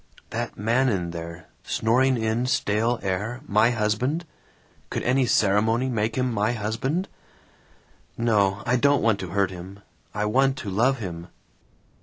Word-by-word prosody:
"That - - -4
man 120 +6 +2
in 90 -6 -1
there, 85 0 -7 0.2
snoring 130 +3 +2
in 115 +2 0
stale 120 -2 +1
air, 105 +7 -2
my 110 +3 +4
husband? 120 +8 0 0.6
Could - - -3
any 130 0 +2
ceremony 110 +5 +2
make 115 -2 -1
him 125 -1 0
my 105 +2 +1
husband? 125 - -2 1.1
"No. 105 -3 +2
I 125 +1 +2
don't 140 +2 +3
want 110 -3 +2
to 95 - -5
hurt 95 0 +1
him. 95 +2 -10 0.3
I 105 0 -2
want 135 +5 +2
to 105 -7 -5
love 125 +7 +2
him. 85 -6 -6
110 Hz, 145 wpm, -25 LUFS, 100-125 Hz, 1.1 s, my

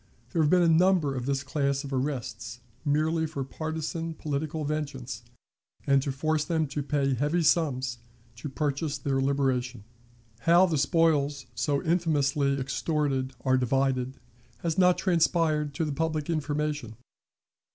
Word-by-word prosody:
There 165 - +1
have 150 - +3
been 180 +1 +5
a - - +4
number 165 -3 +4
of 125 0 -4
this 140 -1 0
class 140 0 -1
of 140 -1 -6
arrests, 120 -4 -3 0.2
merely 160 +2 +1
for 145 -3 -4
partisan 160 +3 -4
political 150 +1 -3
vengeance, 135 -6 -4 0.6
and 140 -1 +4
to 140 - -2
force 155 +3 0
them 160 -2 0
to 145 - -3
pay 140 -1 0
heavy 150 +7 +1
sums 135 -6 +1 0.4
to 145 - -6
purchase 145 +1 -2
their 135 -2 -1
liberation. 130 -4 0 0.6
How 170 +8 +5
the 160 -5 0
spoils 145 -1 +2
so 140 -2 0
infamously 145 -5 +1
extorted 135 -1 -1
are 130 -1 +2
divided, 130 0 0 0.5
has 165 -2 0
not 180 -1 +4
transpired 165 -5 +1
to 160 - 0
the 150 - -2
public 155 +1 -1
information. 150 -6 -2
145 Hz, 140 wpm, -27 LUFS, 135-160 Hz, 0.6 s, been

